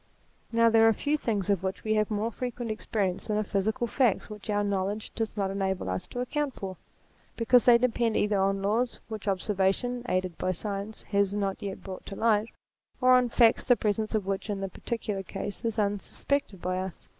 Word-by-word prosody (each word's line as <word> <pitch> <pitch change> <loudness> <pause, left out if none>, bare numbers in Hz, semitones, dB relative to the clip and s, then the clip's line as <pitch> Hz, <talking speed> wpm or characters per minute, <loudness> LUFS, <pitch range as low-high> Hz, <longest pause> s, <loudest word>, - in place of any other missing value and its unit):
Now 230 0 +4
there 225 0 +6
are 225 - +5
few 290 +7 0
things 210 - 0
of 195 -3 +1
which 190 0 -3
we 215 - +1
have 215 -1 +2
more 215 +2 -1
frequent 240 -1 -4
experience 200 -4 -1
than 210 -1 0
of 215 - 0
physical 220 +6 0
facts 235 -3 +1
which 210 0 -9
our 205 0 +2
knowledge 200 +1 -2
does 225 -1 -3
not 195 -1 0
enable 190 - -1
us 95 0 -3
to 245 - -4
account 285 +2 -2
for, 190 -1 -5 0.6
because 240 +1 +4
they 240 -1 +8
depend 235 -2 +1
either 205 -1 +2
on 195 0 +1
laws 230 +5 0
which 215 -2 -6
observation, 200 +5 0
aided 185 -2 -1
by 185 - 0
science, 205 +2 -5
has 200 -1 +1
not 195 -2 -1
yet 195 -1 -5
brought 190 -2 -8
to 195 - -6
light, 220 -1 +2 0.5
or 255 0 +6
on 250 -1 +5
facts 230 -1 +4
the 245 - +5
presence 215 0 0
of 210 -3 0
which 195 +2 -3
in 205 -1 -1
the 195 0 -3
particular 210 0 -3
case 195 +2 -6
is 225 -1 -1
un 205 -1 +1
suspected 245 -3 -2
by 185 0 -1
us. 190 -1 -6
210 Hz, 205 wpm, -28 LUFS, 195-230 Hz, 0.6 s, they